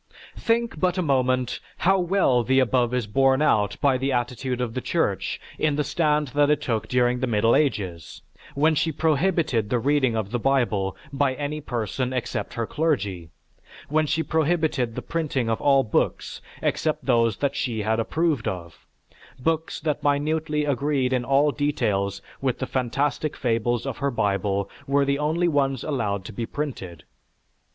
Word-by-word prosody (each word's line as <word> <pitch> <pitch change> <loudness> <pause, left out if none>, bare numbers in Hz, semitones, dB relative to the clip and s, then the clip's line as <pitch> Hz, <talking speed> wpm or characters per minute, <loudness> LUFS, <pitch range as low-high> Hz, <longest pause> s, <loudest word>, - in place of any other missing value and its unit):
Think 230 -6 0
but 180 +1 +1
a 185 - +1
moment 130 -3 +1 0.2
how 190 +2 +3
well 175 -9 +2
the 130 +3 +3
above 125 -1 +2
is 125 -2 0
borne 135 +5 +3
out 105 -9 +2
by 135 -3 +3
the 135 +1 0
attitude 125 0 -2
of 120 -2 -2
the 130 - -3
Church 100 - -1 0.2
in 155 -2 +2
the 150 - +1
stand 150 -1 +1
that 145 +3 +2
it 150 -1 +3
took 110 -4 -1
during 125 0 +2
the 130 - -1
Middle 115 0 +3
Ages, 95 - -1 0.3
when 155 +3 +3
she 160 +2 +1
prohibited 155 - +1
the 125 - +2
reading 130 -1 +2
of 105 -2 -3
the 120 - -1
Bible 115 -7 +1 0.2
by 135 -1 +1
any 150 +2 -4
person 125 0 -3
except 125 -2 -3
her 115 - -1
clergy. 105 - -1 0.6
When 155 +1 +2
she 160 +2 0
prohibited 155 -7 0
the - - -5
printing 145 -8 -1
of 110 - -1
all 135 -1 +4
books 110 - -1 0.2
except 155 -1 -1
those 115 -5 +2
that 140 -1 -1
she 115 -6 -2
approved 115 +6 0
of; 85 -3 -6 0.5
books 160 +4 -1
that 150 -2 -1
minutely 150 +1 0
agreed 140 -1 0
in 125 -1 +1
all 140 +4 +3
details 100 -10 -1 0.2
with 130 -2 0
the 130 - -3
phantastic 135 +4 -1
fables 120 -1 0
of 135 -4 -4
her 140 0 +1
Bible 100 -4 0 0.2
were 140 0 +3
the 140 0 0
only 160 +4 +1
ones 135 -5 +1
allowed 105 -10 -2
to - - -8
be 115 -1 -4
printed. 100 - -5
130 Hz, 165 wpm, -24 LUFS, 115-150 Hz, 0.6 s, all